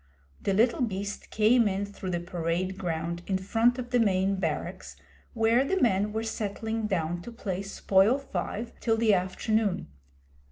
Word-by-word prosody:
The 195 - 0
little 235 +5 +3
beast 200 -3 -3
came 225 +2 +4
in 200 0 -1
through 200 -2 -7
the 175 -1 -1
parade 175 +2 -2
ground 170 -1 -3
in 190 - +1
front 225 +6 +2
of 245 -1 -6
the 245 - +3
main 195 -2 +2
barracks, 190 - -3 0.4
where 225 +3 +4
the 380 +7 0
men 210 - +2
were 220 +1 -2
settling 220 0 -3
down 175 -3 -1
to 240 - -8
play 195 -5 -4
Spoil 195 +3 +3
five 230 -2 -4
till 225 -1 +1
the 220 -2 +4
afternoon. 195 - 0
200 Hz, 160 wpm, -28 LUFS, 185-225 Hz, 0.4 s, came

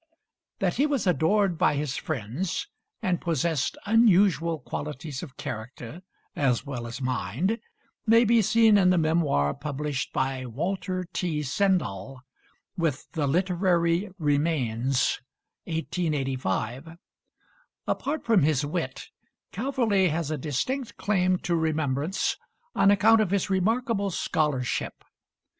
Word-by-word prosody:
That - - 0
he 285 - +3
was 280 -8 -1
adored 180 +1 +2
by 180 - +3
his 145 -1 -2
friends, 145 - -3 0.4
and 180 -2 0
possessed 165 -3 0
unusual 195 - +4
qualities 145 0 -6
of 140 -8 -10
character 120 +6 -7 0.3
as 130 -3 +1
well 125 -4 -5
as 115 +2 -6
mind, 130 - -1 0.5
may 230 +2 +6
be 230 +1 +4
seen 220 0 +5
in 180 -2 +4
the 180 - +4
memoir 155 - +2
published 145 -1 -3
by 130 -1 -1
Walter 185 - -3
T. 160 -5 -1
Sendall 135 - -1 0.5
with 160 -6 -2
the 155 -4 -1
'Literary 175 +2 +1
Remains' 140 - +1 0.4
(1885). 145 - -2 0.9
Apart 305 +3 -2
from 225 -5 +4
his 150 -1 +2
wit, 145 -4 -4 0.5
Calverley 220 -5 +1
has 160 -1 -2
a - - 0
distinct 225 - -2
claim 185 -3 +2
to 175 -1 -1
remembrance 155 +1 0 0.4
on 195 - +4
account 215 +2 +5
of 210 - 0
his 200 0 0
remarkable 215 +2 +1
scholarship. 150 -7 -1
165 Hz, 115 wpm, -26 LUFS, 135-195 Hz, 0.9 s, may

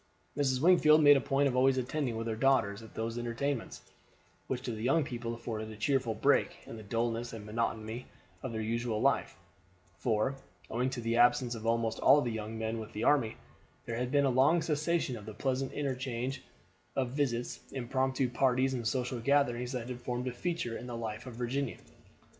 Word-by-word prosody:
Mrs. 130 -3 +1
Wingfield 155 -3 +6
made 145 0 +9
a 135 - +2
point 140 +3 +2
of 130 - -1
always 130 +1 +4
attending 130 -1 -1
with 115 - -3
her 115 -1 -2
daughters 115 -5 +2
at 110 - -13
these 115 +1 -3
entertainments, 120 +2 -3 0.6
which 125 -1 -3
to 125 - -3
the 110 -1 -5
young 135 +7 +3
people 120 -4 -4
afforded 110 -2 -5
a 110 - -8
cheerful 115 +1 0
break 110 - +2
in - - -8
the 110 - -8
dullness 115 +2 -2
and 110 -2 -7
monotony 110 +1 -3 0.3
of 130 - -4
their 110 -1 -3
usual 115 0 -1
life; - - +1 0.6
for, 120 +4 0 0.3
owing 125 +3 0
to 130 -2 -4
the 115 0 0
absence 120 0 +4
of 115 -1 -5
almost 115 -1 +1
all 140 +2 +6
the 120 -5 -1
young 110 0 -5
men 110 +1 -2
with 110 0 -8
the 105 - -3
army, 120 -7 +3 0.5
there 115 -1 -3
had 125 +1 -1
been 140 0 +4
a 135 - +3
long 140 +7 +4
cessation 155 -3 0
of 105 -2 -10
the 110 - -7
pleasant 130 +2 -1
interchange 130 -1 -3 0.5
of 130 -2 0
visits, 125 -4 -1
impromptu 130 +1 0
parties, 130 +2 +2
and 120 -3 -2
social 125 0 -1
gatherings 125 -2 +2
that 125 -3 -4
had 125 -1 -6
formed 125 +1 -3
a - - -1
feature 165 -3 -2
in 125 - -7
the 120 -1 -5
life 110 +1 -5
in 125 - -7
Virginia. 125 +3 -2
125 Hz, 195 wpm, -31 LUFS, 115-135 Hz, 0.6 s, made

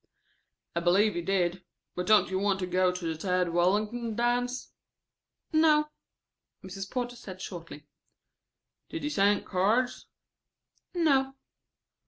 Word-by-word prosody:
"I - - +2
believe 195 +5 +3
you 175 - -1
did. 180 0 0 0.3
But 180 0 -4
don't 215 -2 +5
you 190 - 0
want 200 -1 +1
to - - 0
go 185 0 +2
to 180 -1 -6
the 165 -1 -1
Tad 180 +1 0
Wallington 210 +7 0
dance?" 245 +2 -1 0.8
"No." 305 -1 +4 0.7
Mrs. 195 +1 -7
Porter 245 -1 -3
said 185 -5 -10
shortly. 165 -6 -8 1.0
"Did 330 - -5
you 295 - -1
send 205 -3 +2
cards?" 220 +7 0 0.9
"No." 270 -5 +2
200 Hz, 125 wpm, -29 LUFS, 180-245 Hz, 1.0 s, don't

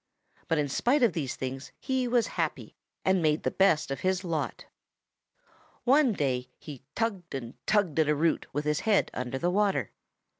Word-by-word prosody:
But 165 - +1
in 150 -1 +1
spite 245 - +2
of 225 -7 +4
these 140 -6 -3
things 130 +1 -5
he 260 -2 -1
was 240 -2 +3
happy - - -3 0.3
and 190 -1 +3
made 155 -1 +2
the - - 0
best 160 -7 +3
of 135 - -2
his 185 0 0
lot. 165 -4 -3 1.2
"One 270 0 +5
day 130 -6 -1
he 145 -5 -10
tugged 195 -9 -2
and 120 -3 -5
tugged 195 -8 +2
at 155 -1 +3
a 150 - +3
root 160 +3 +1
with 145 +2 -2
his 150 -1 +1
head 215 -3 +2
under 125 +1 -3
water. 200 +2 +1
165 Hz, 175 wpm, -28 LUFS, 145-210 Hz, 1.2 s, One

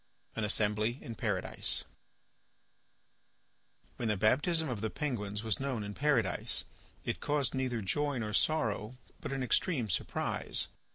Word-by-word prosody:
AN 115 - -1
ASSEMBLY 105 +2 +1
IN 115 - -5
PARADISE - - 0 2.1
When 120 - -1
the 105 -2 +1
baptism 155 - +3
of 120 -6 -3
the 110 - 0
penguins 105 -8 -3
was 110 -3 +1
known 135 -5 -1
in 105 0 -5
Paradise, 115 - +2 0.4
it - - -1
caused 145 -3 +1
neither 130 -4 -1
joy 145 +8 0
nor 105 -3 -2
sorrow, 115 -4 +1 0.2
but - - -5
an 135 -1 -1
extreme 125 - +1
surprise. - - 0
115 Hz, 130 wpm, -33 LUFS, 105-140 Hz, 2.1 s, baptism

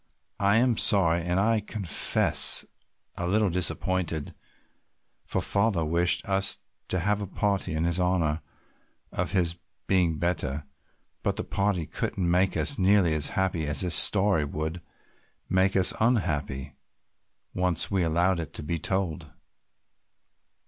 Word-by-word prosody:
I 100 +1 +2
am 120 -1 +2
sorry 85 -4 +3
and 90 +2 -1
I 110 +2 +1
confess 100 -4 +3 0.5
a 90 - -2
little 105 +1 +1
disappointed, 85 -2 -2 0.9
for - - -2
father 100 -5 0
wished 85 +3 +1
us 95 0 +1 0.3
to 90 - -2
have 105 +3 -1
a 100 - -5
party 100 -2 -2
in 80 +1 -1 0.2
honor 85 -4 0 0.7
of - - -4
his 85 -3 0 0.3
being 90 -4 +1
better, 75 -4 -3 0.6
but - - -2
the - - -4
party 100 -4 -2
couldn't 85 +3 -3
make 90 +2 +1
us 140 - +1
nearly 95 -3 +3
as 75 -2 +2
happy 90 -5 -1
as 75 -1 +2
this 90 -2 0
story 100 -5 +6
would 80 +4 -5 0.7
make 95 +1 +1
us 95 -2 +5
unhappy 80 - -1 0.8
once 90 -1 -2
we 95 -2 0
allowed 85 +2 0
it 80 -2 -7
to - - -6
be 85 +2 -3
told." 95 -3 -3
90 Hz, 135 wpm, -26 LUFS, 80-100 Hz, 0.9 s, story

